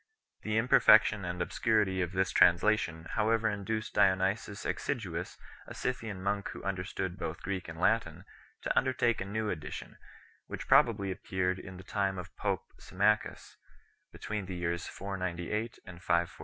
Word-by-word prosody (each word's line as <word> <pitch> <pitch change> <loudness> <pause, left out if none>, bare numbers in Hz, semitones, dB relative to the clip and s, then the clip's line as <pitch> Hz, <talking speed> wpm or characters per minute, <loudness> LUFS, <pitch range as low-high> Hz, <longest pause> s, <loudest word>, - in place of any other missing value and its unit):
The 110 0 -1
imperfection 110 -3 +6
and 90 0 -4
obscurity 105 -1 +1
of 90 -1 -1
this 95 0 0
translation 85 -2 +3
however 110 0 +2
induced 110 +1 -3
Dionysius 100 +2 +1
Exiguus, 95 -10 -3 0.3
a - - -8
Scythian 110 -7 -3
monk 100 0 -1
who - - -8
understood 95 -1 -3
both 85 +1 -5
Greek 95 -1 -3
and 85 -1 -8
Latin, 90 -4 +1 0.4
to - - -1
undertake 125 -4 +2
a - - -2
new 110 +2 -2
edition, 75 - -7 0.5
which - - -6
probably 100 -4 +4
appeared 95 0 -1
in 95 -1 -9
the 95 - -10
time 95 -1 -1
of 90 - -8
pope - - -1 0.2
Symmachus, 105 +3 0 0.5
between 105 -3 -5
the 95 - -5
years 85 -1 -2
498 95 +3 -3
and 90 -1 -11
514 85 -2 +2
5 - - -16
95 Hz, 150 wpm, -31 LUFS, 90-110 Hz, 0.5 s, imperfection